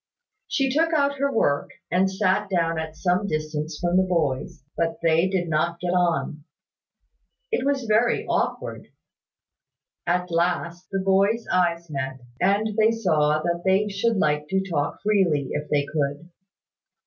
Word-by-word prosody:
She 270 -2 0
took 330 +3 +2
out 280 -2 +1
her 280 0 +1
work, 145 - +1 0.2
and 185 +2 +3
sat 195 +1 0
down 165 -3 0
at 160 0 -5
some 180 +3 +1
distance 155 -1 -3
from 175 0 +1
the - - +6
boys; 155 -9 -1
but 165 0 -1
they 165 +2 +3
did 185 -2 -1
not 170 +2 0
get 175 0 -2
on. 170 -4 0 1.1
It 455 - 0
was 280 -2 +1
very 225 +2 +2
awkward. - - -2 1.2
At 180 +1 0
last, 170 +1 -1
the 195 -1 -1
boys' 200 +4 +2
eyes 170 -2 +1
met, 135 -2 -4 0.2
and 205 +3 +2
they 220 0 +5
saw 155 -9 +1
that 170 0 -1
they 195 +2 +2
should 210 +3 0
like 150 -3 +1
to 190 +3 -1
talk 145 -5 -2
freely, 180 -10 +2
if 150 0 -4
they 145 -1 +1
could. 145 +3 -3
175 Hz, 150 wpm, -24 LUFS, 155-200 Hz, 1.2 s, the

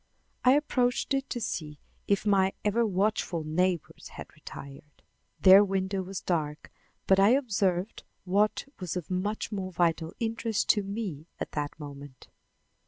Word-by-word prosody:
I 255 - +6
approached 260 -3 +1
it 270 0 -1
to 245 - -3
see 155 -9 -4 0.3
if 200 +1 +1
my 195 -2 +3
ever 220 +3 +2
watchful 195 -4 0
neighbors 175 +2 -1
had - - -10
retired. 140 +1 -12 0.4
Their 195 +1 +8
window 190 -1 -1
was 190 0 -6
dark, 155 -4 -2 0.3
but 190 0 +4
I 205 +6 +6
observed 200 -6 -1 0.2
what 200 +3 +1
was 180 -1 -3
of 180 0 -6
much 205 +5 -2
more 190 -3 -4
vital 165 -2 0
interest 225 -1 -1
to 210 - +5
me 195 -7 -5
at - - -4
that 145 +1 -4
moment. 140 -2 -10
190 Hz, 145 wpm, -28 LUFS, 165-210 Hz, 0.4 s, Their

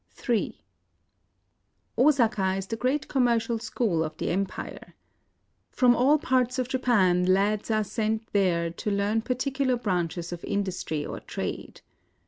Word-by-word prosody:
Ill 235 -4 +1 1.4
Osaka 230 -9 +3
is 195 0 -3
the 225 - -4
great 255 +5 -1
commercial 235 -3 +1
school 220 -7 0
of 155 0 -6
the - - -2
empire. 190 +2 -4 0.7
From 245 -1 +4
all 270 +6 +4
parts 255 -3 +1
of 255 -2 -1
Japan 210 -9 +2
lads 200 +3 +2
are 215 -1 +2
sent 220 +1 -2
there 170 -4 +2
to 170 - -4
learn 205 +2 +1
particular 260 +2 0
branches 175 -6 -2
of 175 - -8
industry 185 -7 -2
or - - -6
trade. - - -6
215 Hz, 130 wpm, -27 LUFS, 190-250 Hz, 1.4 s, From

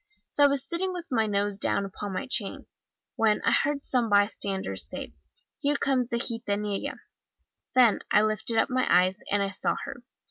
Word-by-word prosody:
So 290 - +2
I - - +9
was 280 -2 -1
sitting 370 +2 -2
with 345 -2 -7
my 225 -3 +2
nose 205 -1 0
down 200 - +1
upon 200 +1 -6
my 190 +9 -3
chain, 225 -6 -2 0.5
when 215 -2 +3
I - - +4
heard 285 0 +1
some 245 -3 0
bystanders 200 - 0
say, - - -7 0.5
'Here 285 0 +1
comes 260 -4 +1
the 235 - 0
gitanella!' 210 -4 -3 0.7
Then 245 -4 +5
I 210 - +5
lifted 215 +1 +1
up 225 - +2
my 255 0 +1
eyes, 185 +2 +4
and 200 0 +2
I 195 - -2
saw 195 - 0
her! 275 -3 -8
220 Hz, 180 wpm, -27 LUFS, 200-265 Hz, 0.7 s, I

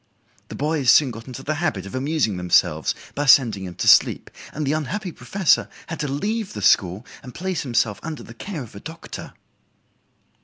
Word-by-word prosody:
The - - -8
boys 150 -3 0
soon 140 -4 +6
got 115 +1 -10
into 130 +1 -8
the 155 - -1
habit 110 - -1
of 100 - -9
amusing 135 - 0
themselves 80 -4 +2 0.2
by 145 0 -2
sending 120 -8 +5
him 90 -1 -8
to - - -3
sleep, - - +5 0.2
and 150 +1 -3
the 140 - +1
unhappy 180 +6 -3
professor 190 +1 +1 0.2
had 165 -1 -6
to 150 - -1
leave 205 +9 -2
the 105 - -6
school, 95 +4 +3 0.2
and 125 - -11
place 185 -2 -2
himself 115 -5 0
under 160 -3 -6
the 115 - -11
care 160 - -6
of 115 - -13
a 100 - -9
doctor." 160 +7 -9
140 Hz, 190 wpm, -22 LUFS, 110-160 Hz, 0.2 s, soon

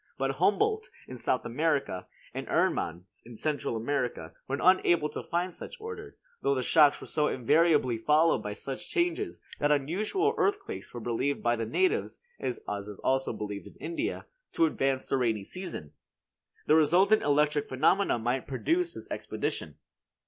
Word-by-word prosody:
But - - -1
Humboldt, 435 +1 +2 0.2
in 130 - -8
South 125 +1 0
America, 140 - -1 0.3
and - - -5
Ehrmann, 85 +2 0 0.2
in 115 -1 -12
Central 145 -3 -1
America, 120 - -2
were 135 - -1
unable 175 -4 +4
to - - -5
find 175 +1 -2
such - - -8
order; 440 -1 -8 0.2
though 140 - +2
the 130 - -1
shocks 150 +1 +5
were - - -9
so 150 -1 +1
invariably 130 -2 +3
followed 150 +1 +3
by 105 -1 -4
such 135 +10 -7
changes 350 +2 -1 0.2
that 145 0 +2
unusual 205 - +1
earthquakes 400 0 -1
were 120 - -6
believed 120 +5 -1
by 120 0 +3
the 115 -1 -3
natives 375 +4 0 0.2
(as 125 - -3 0.3
is 105 -2 -8
also 135 0 +1
believed 105 -1 -5
in - - -14
India) 340 +4 -3 0.3
to 335 - +4
advance 135 - 0
the 135 - 0
rainy 115 -5 0
season. 170 - -7 0.7
The - - +4
resultant 180 +7 +5
electric 145 0 +2
phenomena 155 +6 +3
might 120 +3 -1
produce 335 - 0
this - - -9
expedition. - - -3
150 Hz, 155 wpm, -29 LUFS, 125-195 Hz, 0.7 s, shocks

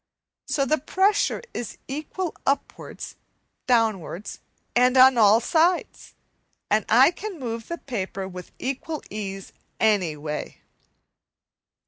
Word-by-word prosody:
So 275 - +1
the 310 +4 +1
pressure 385 - +1
is 235 - -5
equal 310 +6 -4
upwards, 275 +1 -3 0.5
downwards, 215 -6 0 0.4
and 250 +1 +4
on 260 0 +8
all 220 -1 +6
sides, 330 +8 0 0.6
and 215 +1 +3
I 255 +8 +7
can 385 0 -7
move 230 -3 -5
the 340 - -4
paper 195 - -4
with 180 -1 -9
equal 275 +4 -4
ease 195 -2 -6 0.3
any 195 -8 +2
way. 150 0 -5
240 Hz, 110 wpm, -24 LUFS, 205-300 Hz, 0.6 s, on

